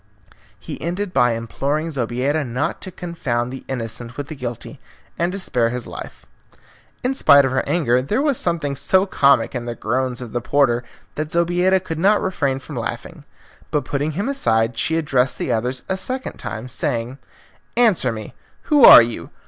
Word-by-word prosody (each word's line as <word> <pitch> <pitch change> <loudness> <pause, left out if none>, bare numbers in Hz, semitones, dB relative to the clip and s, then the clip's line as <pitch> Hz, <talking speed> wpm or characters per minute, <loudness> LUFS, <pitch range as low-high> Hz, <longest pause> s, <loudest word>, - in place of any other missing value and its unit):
He - - -8
ended 180 +3 -3
by 120 -3 +3
imploring 140 +7 -2
Zobeida 135 +3 -1
not 125 -1 -3
to 185 - -6
confound 130 -9 -3
the 135 - -8
innocent 120 -1 -6
with 145 -1 -5
the 155 - -6
guilty 120 -4 -6 0.4
and 170 +1 +1
to 195 - -4
spare 125 -11 0
his 125 0 -4
life. - - -9 0.8
In 255 +2 +1
spite 140 - +6
of 135 - -1
her 130 - 0
anger, 125 -8 +2
there 150 - -1
was 285 -3 +2
something 145 -4 -1
so 190 +7 +2
comic 140 -7 +3
in 125 -2 -4
the 120 0 -4
groans 125 +2 -2
of 125 -3 -7
the 120 - -1
porter 120 -2 +2 0.3
that 155 0 -4
Zobeida 175 +2 +2
could 165 -3 -6
not 205 +4 +4
refrain 140 -8 -1
from 135 0 -9
laughing. 115 - -6 0.4
But 150 - -1
putting 145 +2 -2
him 200 - -2
aside 115 - +1
she 160 +8 0
addressed 135 -5 +1
the - - -2
others 125 +3 -1
a 190 - -1
second 255 +7 -3
time, 110 +3 -6
saying, 125 0 -3 0.6
"Answer 210 - +3
me; 110 -2 -7 0.3
who 295 -4 +3
are 120 - +11
you? 115 -8 -6
140 Hz, 180 wpm, -20 LUFS, 120-170 Hz, 0.8 s, are